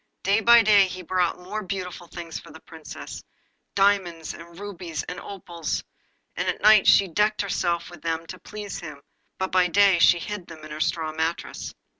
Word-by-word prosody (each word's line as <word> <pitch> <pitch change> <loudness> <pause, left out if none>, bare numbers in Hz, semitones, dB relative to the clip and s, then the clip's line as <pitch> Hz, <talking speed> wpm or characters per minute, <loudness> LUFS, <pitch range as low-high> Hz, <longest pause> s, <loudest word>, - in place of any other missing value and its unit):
Day 200 +3 +3
by 235 0 +7
day 205 -2 +6
he 185 0 -7
brought 180 0 0
more 195 +4 -5
beautiful 185 -3 -5
things 170 -1 -7
for - - -14
the - - -12
Princess - - -10 0.5
diamonds, 190 -5 +1
and 170 0 -12
rubies, 180 -6 -5
and 180 - -6
opals; 175 -5 -5 0.5
and - - -2
at - - -2
night 215 -1 +6
she 200 - +6
decked 210 +4 +1
herself 175 -3 -1
with 175 - -12
them 165 0 -2
to 185 +2 -9
please 210 -2 -7
him, 150 -4 -9 0.3
but 190 0 -2
by 185 -1 +4
day 195 0 +4
she 175 - +6
hid 185 +1 -6
them 155 -2 -11
in 155 - -11
her 155 +1 -5
straw 160 -1 0
mattress. 160 +2 -3
180 Hz, 185 wpm, -25 LUFS, 165-200 Hz, 0.5 s, by